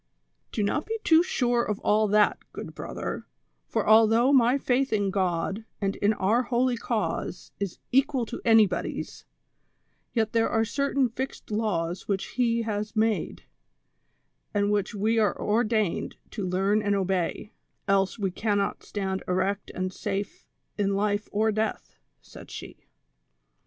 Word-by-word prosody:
"Do 215 - -1
not 295 +9 -1
be 450 +1 -2
too 325 0 +6
sure 245 -8 +1
of 210 -3 -2
all 215 +1 +3
that, 210 +1 +3
good - - -7
brother; - - -5 0.4
for - - -1
al 220 +1 +7
though 235 +5 +3
my 250 0 +5
faith 265 0 +1
in 205 -3 +1
God 190 +2 -1 0.2
and 195 -1 -1
in 205 - +3
our 215 +5 +2
lioly 250 0 +2
cause 180 -6 -3
is 200 -3 -3
equal 270 -1 +2
to 235 - -7
anybody's, 220 -6 +2 0.9
yet 220 -2 +1
there 225 -1 +3
are 225 0 +2
certain 280 +2 +1
fixed 255 0 -6
laws 185 -5 -1
which 200 +5 -3
lie 235 -1 +2
has 210 0 -3
made, 220 0 0 1.1
and 205 0 +2
which 205 +1 0
we 220 +3 +2
are 210 -2 +1
ordained 215 -3 0 0.2
to 200 -4 -3
learn 195 +4 +2
and 205 -1 +1
obey, 190 +1 -1 0.3
else 195 0 +2
Ave 195 -2 0
cannot 205 +1 -1
stand 190 -2 -3
erect 195 +2 -1
and 185 0 -2
safe 205 - -4 0.3
in 200 -1 +1
life 205 +1 0
or 220 +2 +2
death," 215 +1 -2 0.3
said - - -13
she. - - -10
210 Hz, 145 wpm, -27 LUFS, 195-230 Hz, 1.1 s, al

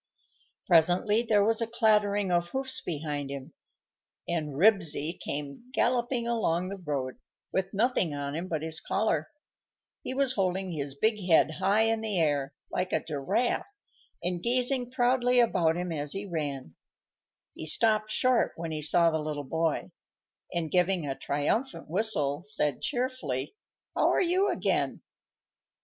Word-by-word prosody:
Presently 180 +6 +4
there 210 -4 +3
was 225 +1 +3
a 230 - 0
clattering 210 -4 +2
of 175 0 +2
hoofs 265 0 -2
behind 145 -3 -4
him, 140 +2 -7 0.7
and 155 -4 -2
Ribsy 170 -3 +2
came 145 - -5
galloping 240 0 +1
along 185 -7 0
the 200 - -5
road, 140 -8 -4 0.3
with 190 0 -1
nothing 200 - +1
on 140 0 -4
him 170 +4 -4
but 160 -3 -3
his 160 0 0
collar. 180 -7 -1 0.7
He 260 - -5
was 270 -2 +2
holding 190 -3 -1
his 140 -4 -4
big 215 +5 +1
head 160 -1 +5
high 200 +3 +3
in 225 0 +1
the 215 -3 -2
air, 145 -4 +1 0.2
like 180 0 -2
a - - 0
giraffe, 155 - -1 0.6
and 175 0 -1
gazing 250 +2 +1
proudly 250 0 +2
about 170 -8 +3
him 180 0 -3
as 145 -2 0
he 195 +1 -4
ran. 145 - -4 0.8
He 155 - -5
stopped 215 +4 +3
short 250 +2 +2
when 165 -1 -5
he 155 -1 -3
saw 170 +2 +3
the 160 - -1
little 150 -1 -4
boy, 160 +3 -1 0.6
and, 165 -3 -2
giving 180 -2 +2
a 135 - -2
triumphant 150 - -2
whistle, 160 -8 +3
said 150 -10 0
cheerfully, 255 - -2 0.4
"How - - +3
are - - +2
you 370 +3 +2
again?" - - -1
180 Hz, 150 wpm, -28 LUFS, 150-225 Hz, 0.8 s, head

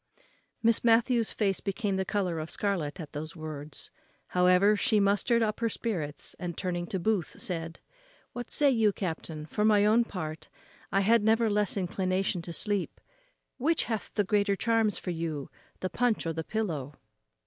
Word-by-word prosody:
Miss 230 0 +3
Matthews's 230 0 +3
face 195 -3 0
became 200 0 -2
the 190 0 -1
colour 185 -5 -1
of 155 +1 -5
scarlet 190 -6 -2
at 155 -3 -7
those 155 +4 -6
words. 155 -2 -7 0.4
However, 180 +3 +4
she 215 +1 +2
mustered 205 +4 +3
up 215 -1 -1
her 230 0 +1
spirits, 170 -11 -4
and, 175 -2 -4
turning 175 -2 -2
to 190 - -2
Booth, 200 -2 -1
said, 165 -2 -4 0.5
"What 245 -1 -6
say 290 -2 +5
you, 225 -4 +3
captain? 160 -4 -4
for 210 +6 -2
my 210 -1 +5
own 220 +3 +5
part, 155 -6 -6 0.4
I 195 - +3
had 225 +2 +4
never 220 0 +3
less 205 -1 +1
inclination 185 0 -1
to 170 - -7
sleep; 200 +2 -2 0.6
which 315 +5 +2
hath 220 -3 -3
the 205 - +3
greater 200 0 +2
charms 225 -1 +1
for 180 - -4
you, 160 -4 -4 0.3
the 185 - -1
punch 240 -1 +1
or 165 - -1
the 160 0 -3
pillow?" 155 -10 -3
195 Hz, 170 wpm, -29 LUFS, 170-220 Hz, 0.6 s, say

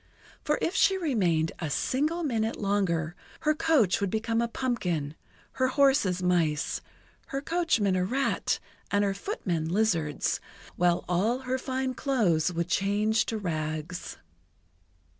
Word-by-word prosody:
For 300 - +1
if 340 - 0
she 385 0 +4
remained 185 - +1
a 160 - -3
single 305 - 0
minute 225 -6 0
longer, 175 -5 0 0.3
her 305 -1 +3
coach 300 - +2
would 200 - +1
become 225 +2 0
a 235 - +1
pumpkin; 180 - -2 0.4
her 260 - +1
horses, 265 -10 +3
mice; 165 -5 +1 0.5
her 275 - -3
coachman, 285 - +1
a 185 - +1
rat; 265 +9 0 0.3
and 205 0 +2
her 200 -1 +1
footmen, 180 - -3
lizards; 170 -7 +1 0.4
while 175 -1 +2
all 215 +9 +1
her 260 0 -2
fine 260 0 -2
clothes 200 - +1
would 170 0 -2
change 205 +4 +1
to 225 - -2
rags. 155 -2 -4
205 Hz, 135 wpm, -28 LUFS, 175-260 Hz, 0.5 s, she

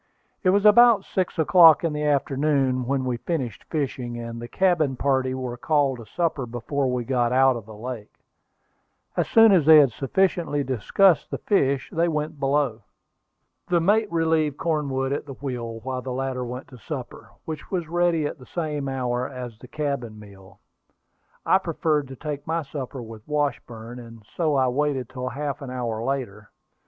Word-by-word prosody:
It 185 - +4
was 200 +2 +3
about 215 -1 +7
six 185 -1 -2
o'clock 165 0 +6
in 165 -2 0
the 150 - -3
afternoon 135 -3 +1
when 135 -1 0
we 125 -2 -1
finished 130 - -4
fishing, 130 -6 -3
and 115 0 -6
the 120 - -6
cabin 165 -5 +1
party 130 -1 0
were 125 -2 -5
called 140 -1 +1
to 115 - -11
supper 155 - -2
before 125 +3 -2
we 125 -1 -1
got 120 -1 0
out 130 0 +4
of 115 -3 -8
the 110 - -10
lake. 115 -1 -8 1.0
As - - 0
soon 225 -1 +6
as 170 -6 +4
they 160 -1 +10
had 140 -4 +6
sufficiently 145 +3 0
discussed 145 - +2
the - - -3
fish, 140 - +1
they 170 +1 +1
went 155 -1 -3
below. 135 -4 0 0.9
The 175 -1 +2
mate 205 +4 +2
relieved 160 -3 +1
Cornwood 140 -5 -1
at 145 - -4
the 135 - -6
wheel 120 -5 -5
while 130 +1 -4
the 130 - -6
latter 130 -1 -2
went 125 +2 -7
to 125 - -13
supper, 130 -1 -7 0.2
which 155 -2 -7
was 175 -4 -2
ready 170 -2 +1
at 145 - -4
the 125 - -14
same 150 -5 -3
hour 125 -1 -2
as 125 -4 -8
the 125 - -12
cabin 140 -6 -3
meal. 100 -2 -15 0.9
I 190 - +4
preferred 155 -4 -1
to 135 - -9
take 145 +2 -6
my 165 0 -1
supper 135 -2 -6
with 110 -1 -10
Washburn, 125 -5 -3
and 115 -2 -12
so 155 -4 +1
I 130 -1 +3
waited 135 -1 -1
till 130 -1 -5
half 140 +2 -4
an 135 - -7
hour 120 -3 -3
later. 120 -6 -4
135 Hz, 180 wpm, -24 LUFS, 125-155 Hz, 1.0 s, they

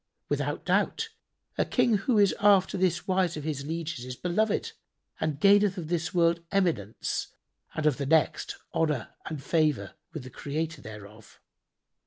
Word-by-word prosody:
Without - - -1
doubt, 450 0 +1 0.5
a - - +5
King 225 -3 +2
who 220 +4 +1
is 200 -2 +5
after 200 -2 +5
this 180 -2 0
wise 185 -3 +1
of 150 - -5
his 145 -3 -3
lieges 165 -5 -3
is 125 0 -6
beloved 195 +9 0 0.5
and 150 -2 -1
gaineth 200 0 +5
of 160 -3 -5
this 170 -2 -1
world 170 -1 +2
eminence 165 - 0 0.5
and 155 - -2
of 150 -4 +3
the 140 - -3
next 160 +1 +2 0.2
honour 150 -8 0 0.2
and 150 -4 -5
favour 150 - +1 0.2
with 155 -6 -6
the 130 - -10
Creator 155 +5 -4
thereof. 105 0 -12
165 Hz, 155 wpm, -28 LUFS, 140-185 Hz, 0.5 s, a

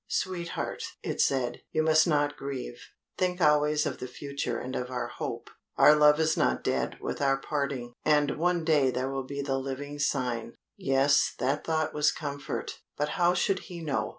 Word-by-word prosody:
"Sweetheart," 175 -2 -3 0.2
it - - -1
said, 130 -3 0
"you 155 - +1
must 155 +1 +4
not 145 -2 +1
grieve 135 - -6 0.4
think 180 0 0
always 150 -1 +3
of - - -3
the 125 - -5
future 140 -1 -4
and 130 +1 -5
of 125 0 -3
our 125 -1 -3
hope. - - -6 0.3
Our - - +8
love 150 0 +5
is 160 0 +2
not - - +1
dead - - -1
with - - -4
our 135 -1 +3
parting, 135 -4 -3
and 150 -2 +3
one 175 -1 +1
day 150 -5 +4
there 130 +1 -2
will 135 -1 -4
be 140 0 -4
the 135 -1 -1
living 140 +2 -5
sign 125 -5 -1
" - - -61
Yes, 135 +2 +2
that 135 +4 0
thought 155 -1 0
was 150 0 +3
comfort 145 -2 -5 0.2
but 150 +1 0
how 175 +2 +2
should 190 +1 +1
he 175 -2 -7
know? 150 -4 -1
145 Hz, 185 wpm, -28 LUFS, 135-155 Hz, 0.4 s, Our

